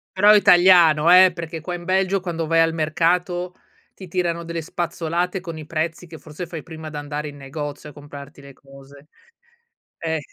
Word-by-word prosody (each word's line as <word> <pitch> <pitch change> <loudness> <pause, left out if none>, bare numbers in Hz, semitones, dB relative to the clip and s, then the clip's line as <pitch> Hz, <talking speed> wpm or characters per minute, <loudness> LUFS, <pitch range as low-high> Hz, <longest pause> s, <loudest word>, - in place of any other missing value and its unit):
Però 205 +2 +4
è - - +7
italiano, 175 -5 +5
eh! 185 0 +7
Perché 165 -2 -7
qua 175 +3 -6
in 175 -1 -7
Belgio, 190 +1 +1
quando 170 -3 -4
vai 165 +1 +1
al 165 0 +3
mercato, 175 +3 -1 0.4
ti 185 -3 -12
tirano 170 -1 -2
delle 165 0 -5
spazzolate 175 +2 -3
con 170 -3 -8
i 155 - -9
prezzi 160 +2 -4
che 160 -1 -12
forse 155 +4 -9
fai 165 -3 -8
prima 160 -2 -9
di 150 - -8
andare 145 +1 -5
in 145 - -12
negozio 145 +1 -7
a - - -19
comprarti 145 0 -12
le 140 0 -13
cose. 140 +1 -17 0.9
Eh. 160 -1 -2
165 Hz, 185 wpm, -21 LUFS, 150-175 Hz, 0.9 s, è